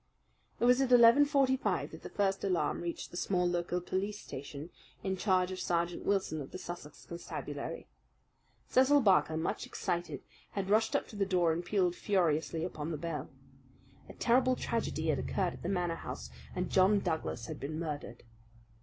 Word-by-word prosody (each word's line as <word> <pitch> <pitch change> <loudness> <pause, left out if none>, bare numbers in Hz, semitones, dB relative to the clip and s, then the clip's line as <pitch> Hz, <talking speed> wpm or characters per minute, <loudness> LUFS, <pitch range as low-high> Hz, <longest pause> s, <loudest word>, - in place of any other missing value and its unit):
It - - +2
was 250 +2 +5
at 260 -2 +1
eleven 245 +4 +8
forty 275 -2 +3
five 265 - -1
that - - -10
the - - -8
first 195 -1 0
alarm 185 -4 0
reached 170 -1 -5
the 175 - -7
small 180 -1 +1
local 175 0 -1
police 200 +4 -3
station, 145 +4 -8 0.3
in 190 -1 -1
charge 185 -1 +2
of 185 - -5
Sergeant 170 -1 -1
Wilson 190 -6 0
of 135 - -7
the - - -7
Sussex 175 -5 -8
Constabulary. 170 0 -6 0.8
Cecil 280 +3 +5
Barker, 185 -7 +4
much 160 - -2
excited, 170 -5 -3 0.3
had 195 -1 -2
rushed 220 +1 +3
up - - 0
to - - -11
the 200 - +1
door 175 -4 +3
and 170 +2 -3
pealed 180 -1 +1
furiously 165 -5 +1
upon 160 -3 -4
the 160 - -2
bell. 155 -2 -4 0.8
A - - -8
terrible 255 +2 +3
tragedy 190 -11 -2
had 150 - +2
occurred 185 -3 -1
at - - -11
the 175 - -3
Manor 180 -3 0
House, - - -7 0.2
and 180 0 -2
John 195 +2 +5
Douglas 160 -10 -2
had - - -6
been 145 +4 -4
murdered. 150 -7 -5
180 Hz, 180 wpm, -32 LUFS, 165-205 Hz, 0.8 s, eleven